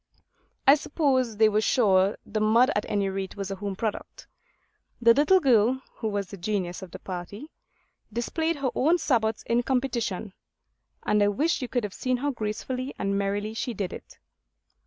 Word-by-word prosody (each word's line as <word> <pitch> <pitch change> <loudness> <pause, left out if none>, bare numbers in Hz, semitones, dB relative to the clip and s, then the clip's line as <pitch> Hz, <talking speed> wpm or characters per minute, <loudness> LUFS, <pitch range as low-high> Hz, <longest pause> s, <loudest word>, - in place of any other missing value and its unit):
I 275 - +9
suppose 270 -6 0
they 220 0 +6
were 215 0 +2
sure 200 -4 +3
the 215 - -3
mud 230 +5 +4
at 205 - -1
any 200 -1 0
rate 190 0 -4
was 195 -1 -5
a 195 - -4
home 200 0 -4
product. 215 +1 -5 0.7
The 230 -1 +6
little 300 +9 +4
girl 250 - +3 0.2
(who 225 - -3
was 205 -2 -2
the 200 - -7
genius 180 -1 -3
of 190 - -8
the - - -8
party) 195 - -7 0.6
displayed 320 +9 -1
her 275 -4 -2
own 320 +7 +3
sabots 225 -9 0
in 235 +1 +1
competition; 235 -6 -2 0.7
and 210 0 +2
I 205 - +4
wish 295 +11 0
you 255 - -3
could 245 -1 -1
have 205 -2 -4
seen 255 -1 -1
how 285 +3 -1
gracefully 255 +3 -4
and 200 0 -1
merrily 200 +2 -1
she 230 +1 -3
did 190 -2 -3
it. - - -11
220 Hz, 180 wpm, -26 LUFS, 200-255 Hz, 0.7 s, I